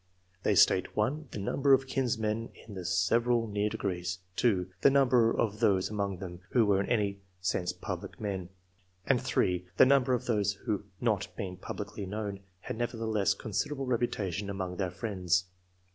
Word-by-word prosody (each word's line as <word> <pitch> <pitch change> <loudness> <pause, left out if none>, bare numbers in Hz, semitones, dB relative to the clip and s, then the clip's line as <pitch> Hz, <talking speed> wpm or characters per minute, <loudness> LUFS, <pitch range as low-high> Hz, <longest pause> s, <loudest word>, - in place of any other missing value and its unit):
They - - +2
state— 95 - +4
(1) 140 +9 0
the - - -7
number 135 +7 +2
of 135 0 +4
kinsmen 115 -4 -1 0.2
in 110 - -10
the 95 -2 -6
several 115 +7 +2
near 105 -1 0
degrees; 90 -3 -3 0.2
(2) 100 -7 +2 0.2
the - - +7
number 125 -4 +4
of 105 -2 0
those 100 -4 +2
among 100 -2 -2
them 90 -2 -7
who 120 -3 +5
were 100 -2 +3
in - - -4
any 105 -4 +3
I.]. 100 0 -7 0.2
ANTECEDENTS, 90 - +1
71 90 0 -1
sense - - -3
public - - -6
men; 95 -4 -3 0.6
and - - +3
(3) 90 0 0
the - - +8
number 130 -1 +4
of 120 - -4
those 105 -4 +1
who, 100 0 -3
not 110 -5 +1
being 95 -2 -4
publicly 100 +1 -6
known, 100 0 -4 0.2
had - - -5
never 120 0 -2
theless 110 -3 +1
considerable 125 +7 -2
reputation 105 -6 -1
among 95 -2 -4
their 95 -3 0
friends. 90 -2 0
105 Hz, 180 wpm, -30 LUFS, 95-115 Hz, 0.6 s, the